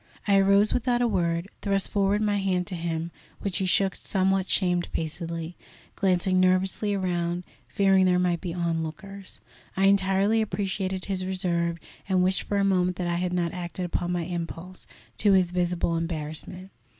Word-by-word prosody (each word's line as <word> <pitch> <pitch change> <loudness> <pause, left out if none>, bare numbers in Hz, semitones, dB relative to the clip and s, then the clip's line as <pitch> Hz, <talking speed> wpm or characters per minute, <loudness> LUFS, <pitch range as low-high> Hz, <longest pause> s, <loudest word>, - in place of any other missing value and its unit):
I 200 -1 +5
arose 200 +2 +4
without 245 0 +1
a - - +3
word, 170 -4 0
thrust 195 -1 0
forward 200 0 +2
my 205 -1 +1
hand 185 -2 0
to 185 - -6
him, 165 0 -3 0.3
which 200 -1 -1
he 190 - 0
shook 195 +1 +3
somewhat 190 -1 0
shamefacedly, 170 -2 -1 0.4
glancing 185 -1 +2
nervously 185 +3 +2
around, 175 -2 -1 0.2
fearing 195 -1 +3
there 180 -1 +3
might 180 -2 +1
be 180 - -4
onlookers. 170 +3 -4 0.4
I 195 - +3
entirely 195 +2 +3
appreciated 190 -3 -2
his 190 -2 -2
reserve, 170 -2 -1 0.3
and 185 -1 +3
wished 185 +1 +2
for 205 - -2
a 200 - +2
moment 180 -2 +2
that 180 - -3
I 170 0 0
had 180 0 -1
not 175 -2 -1
acted 180 0 -4
upon 175 0 -2
my 175 -1 -1
impulse, 175 +1 -6 0.3
to 205 -2 +4
his 185 -2 +3
visible 175 -1 0
embarrassment. 165 +3 -5
185 Hz, 160 wpm, -26 LUFS, 175-195 Hz, 0.4 s, I